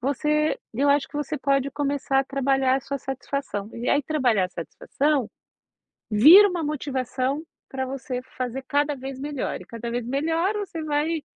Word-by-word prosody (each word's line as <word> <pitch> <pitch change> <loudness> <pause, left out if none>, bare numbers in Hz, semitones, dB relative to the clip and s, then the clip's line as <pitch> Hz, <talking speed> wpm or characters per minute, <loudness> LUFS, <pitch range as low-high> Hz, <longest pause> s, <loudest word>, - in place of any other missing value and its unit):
você 300 +4 +1
eu 275 +5 +1
acho 285 0 +3
que 290 - -8
você 295 +1 -2
pode 275 0 +1
começar 280 -2 0
a 270 - -3
trabalhar 270 -1 +1
a - - -2
sua 280 +2 -4
satisfação, 265 -5 -4
e 235 +1 -4
aí 290 - +3
trabalhar 255 -10 +2
a - - -18
satisfação 245 - -1 0.8
vira 315 - +9
uma 350 -4 -2
motivação 270 -1 -2 0.3
para 265 -1 -3
você 255 -1 -4 0.2
fazer 255 +1 -3
cada 290 0 +1
vez 265 0 -7
melhor. 285 0 -3
E - - -10
cada 235 0 -6
vez 240 0 -3
melhor, 325 - 0
você 360 -5 -5
vai 305 +1 0
275 Hz, 170 wpm, -24 LUFS, 255-295 Hz, 0.8 s, vira